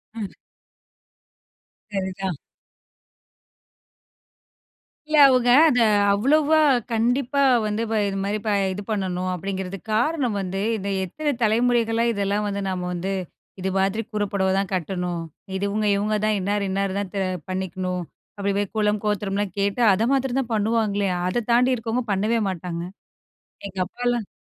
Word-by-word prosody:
ம். 215 -4 -5 1.6
சரிதான். 190 -3 -3 2.7
இல்ல, 310 0 +1
அவுங்க 250 -2 +3 0.2
அத 250 - +2 0.4
அவ்வளவா 295 +8 +3 0.3
கண்டிப்பா 245 +4 +1 0.3
வந்து 210 +1 -1
இப்ப 225 0 -1
இதுமாரி 195 +2 -2 0.4
இது 205 - -5
ப - - -23
பண்ணணும் 185 -3 -1
அப்பிடிங்கிறதுக் 190 +1 -5
காரணம் 250 -1 +1
வந்து, 190 0 -3 0.2
இந்த 200 -1 -4 0.2
எத்தனை 295 - -2
தலைமுறைகளா 230 0 +2
இதெல்லாம் 200 0 -1
வந்து 200 0 -2
நம்ம 185 -1 -3
வந்து 185 +3 -3 0.5
இது 190 - -1
மாதிரி 195 +3 +1
கூர 210 -1 0
புடவதான் 190 0 +1
கட்டணும். 180 -1 -2 0.3
இதுவுங்க, 200 +2 -1
இவுங்க 210 +1 0
தான் 215 -1 +2
இன்னார், 200 +2 -1
இன்னாரு 195 0 -1
தான் 195 -3 -4 0.4
பண்ணிக்கணும். 185 -1 -3 0.3
அப்பிடி 200 0 -1
போய் 205 -2 -3
குலம், 210 -1 +1
கோத்திரம்லாம் 205 -2 -1
கேட்டு 200 +4 0
அதமாத்திரதான் 255 +3 0
பண்ணுவாங்களே! 210 -2 +1 0.2
அத 225 +5 -1
தாண்டி 250 +2 +4
இருக்கவங்க 230 +1 -2
பண்ணவே 215 +4 +1
மாட்டாங்க. 170 -2 -4 0.8
எங்க 195 - -12
அப்பாலாம் 240 +2 -2
205 Hz, 120 wpm, -23 LUFS, 190-230 Hz, 2.7 s, தாண்டி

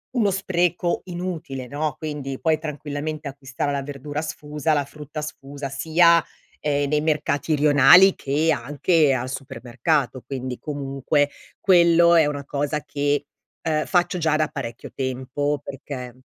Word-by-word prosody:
uno 210 -5 +3
spreco 180 -2 0
inutile, 170 -8 -5
no, 150 +1 -2
quindi 145 -4 -5
puoi 160 -1 +2
tranquillamente 150 0 -5
acquistare 135 +1 -4
la 140 -1 -2
verdura 145 +1 -5
sfusa, 150 0 -2
la 145 -1 +2
frutta 150 +1 -8
sfusa, 140 -1 -7
sia, 170 +3 +4 0.4
ehm, 145 -1 0
nei 150 0 +2
mercati 150 0 0
rionali 150 +6 +7
che 150 +4 +1
anche 145 +3 +2
al 130 0 -2
supermercato. 130 +1 -2
Quindi 130 -2 -5
comunque 145 0 -1 0.3
quello 170 -2 +5
è 160 - +6
una 145 -1 -3
cosa 145 +1 -2
che, 145 0 -1 0.4
uhm, 155 -1 0
faccio 175 0 +1
già 160 -2 +1
da 155 0 +2
parecchio 120 -5 -7
tempo, 130 +2 -2
perché 130 -3 -7
145 Hz, 135 wpm, -23 LUFS, 140-160 Hz, 0.4 s, rionali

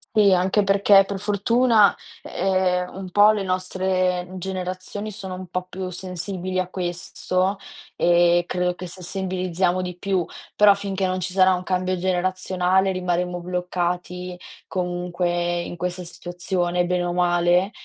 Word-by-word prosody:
Sì, 205 -3 +6
anche 190 +3 +2
perché, 195 0 +5
per 195 0 -5
fortuna, 210 +2 +3 0.3
ehm, 185 -1 0
un 190 -1 -7
po' 205 +2 +6
le 205 - -2
nostre 185 -1 0
generazioni 185 +3 -5
sono 190 -2 -6
un 185 0 -7
po' 180 +1 -4
più 185 0 -5
sensibili 185 +1 -4
a 185 -1 0
questo 185 +1 -1 0.4
e 175 0 +4
credo 180 0 0
che 180 0 -8
sensibilizziamo 185 0 -2
di 180 -1 -5
più. 185 -1 -1 0.3
Però, 205 -1 +7
finché 195 -1 -3
non 185 0 -1
ci 185 0 -4
sarà 190 -1 +5
un 180 - -2
cambio 185 0 -1
generazionale, 185 +1 +1
rimarremo 180 -1 -1
bloccati, 180 0 -3 0.3
comunque, 175 -1 -1
in 175 - -6
questa 180 +1 -3
situazione, 175 0 -2
bene 180 0 0
o 175 0 -2
male, 175 +1 +2
185 Hz, 140 wpm, -23 LUFS, 180-190 Hz, 0.4 s, Però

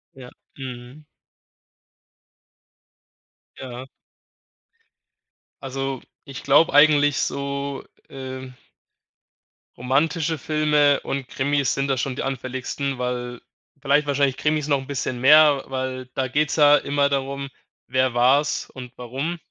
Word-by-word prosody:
Ja, 130 -2 -11 0.3
mhm. 130 +2 -9 2.5
Ja. 130 -1 -8 1.8
Also, 135 -1 -4 0.2
ich 135 -1 -9
glaube 145 +4 +4
eigentlich, 145 -1 +5
so 140 0 -3 0.3
ähm 130 -1 -8 1.2
romantische 155 +6 0
Filme 150 -1 +2
und 135 -2 -4
Krimis 140 -1 0
sind 135 0 -1
da 135 - +1
schon 130 +1 -2
die - - -4
anfälligsten, 130 +1 -4
weil 125 -1 -4 0.4
vielleicht 145 +1 +2
wahrscheinlich 140 -2 +1
Krimis 150 +1 0
noch 140 - +3
'n 135 - -10
bisschen 130 -3 -3
mehr, 145 +1 +6
weil 130 -1 -4
da 130 -1 -1
geht's 145 +2 0
ja 145 -1 +6
immer 140 0 0
darum, 140 0 -3 0.4
wer 130 -1 +1
war's 135 +5 +2
und 125 -1 -10
warum. 135 +8 -4
135 Hz, 110 wpm, -23 LUFS, 130-145 Hz, 2.5 s, mehr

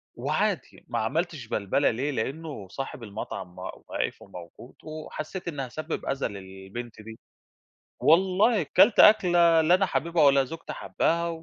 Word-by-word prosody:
وعادي - - -2
ما - - -2
عملتش 145 +3 -2
بلْبَلة 105 +7 +1
ليه؟ 130 +6 -2
لإنّه 135 -3 -5
صاحب 135 +1 -6
المطعم 100 -3 -7
واقف - - -5
وموجود 90 +5 -12
وحسّيت 155 +3 -7
إنّي 145 -5 -3
هاسبِّب 155 +5 -5
أذى 135 0 -1
للبنت 100 +3 -9
دي. 110 +1 -11 0.8
والله 190 +6 +4
كلْت 200 - +4
أكلة 175 -6 +6
لا 165 +3 +4
أنا 195 +1 +3
حاببها 170 -2 +1
ولا 140 -1 +5
زوجتي 165 +5 -8
حابّاها 170 +1 -1
145 Hz, 130 wpm, -26 LUFS, 110-170 Hz, 0.8 s, أكلة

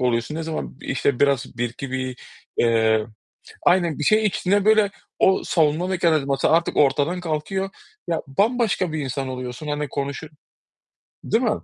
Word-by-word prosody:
oluyorsun, 120 +2 0
ne 165 - -3
zaman 160 -4 -5
işte 135 0 -1
biraz 135 -4 +1
bir 120 -1 0
iki, 135 +2 -7
bir, 130 -1 -3 0.4
eee, 110 -2 +3 0.6
aynen 175 -4 +3
bir 150 - -1
şey 215 +6 +4
içtiğinde 200 0 +1
böyle, 215 -2 +4 0.3
o 190 - +4
savunma 160 +1 +1
mekanizması 155 -7 +1
artık 170 +2 +2
ortadan 150 +5 +2
kalkıyor. 180 +4 -2 0.4
Ya 165 -2 -1
bambaşka 205 - +1
bir 155 - -2
insan 135 -1 -3
oluyorsun, 130 +3 -6
hani 150 0 -2
konuşur 140 +3 -4 1.0
değil 225 +3 +1
mi? 230 - +3
150 Hz, 150 wpm, -23 LUFS, 130-180 Hz, 1.0 s, şey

